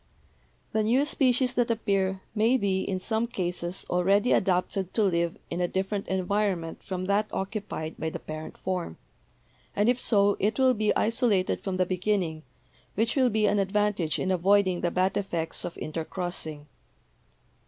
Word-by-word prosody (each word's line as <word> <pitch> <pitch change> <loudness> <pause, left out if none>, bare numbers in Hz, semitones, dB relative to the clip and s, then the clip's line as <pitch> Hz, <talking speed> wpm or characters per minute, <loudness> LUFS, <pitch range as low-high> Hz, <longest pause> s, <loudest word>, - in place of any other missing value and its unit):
"The 220 - +1
new 250 +6 +3
species 255 -3 +2
that 245 -2 +1
appear 195 -4 0
may 225 +4 +3
be 195 -4 0
in 190 -1 -2
some 220 +4 0
cases 180 -3 -3
already 195 +6 +2
adapted 185 0 +1
to 220 - +3
live 170 -3 +1
in 170 +1 -2
a 175 - +2
different 195 +2 -2
environment 190 -3 -1
from 185 -1 -4
that 200 +2 +2
occupied 195 -5 -4
by 160 - -1
the - - -5
parent 155 0 -8
form, 180 - -3 0.8
and 205 +2 +2
if 245 +1 +3
so, 200 -2 +3
it 210 +3 +1
will 260 -1 +4
be 215 -2 +1
isolated 225 -5 +1
from 190 -2 -2
the 185 - +2
beginning, 180 -3 -1 0.5
which 225 +3 +1
will 260 -3 +4
be 215 -1 +1
an 205 0 +2
advantage 195 -4 +1
in 190 - -1
avoiding 185 0 +3
the 175 - +1
bad 185 +2 +1
effects 170 -5 -2
of 170 - -5
intercrossing. 160 -1 -5
195 Hz, 160 wpm, -27 LUFS, 180-215 Hz, 0.8 s, will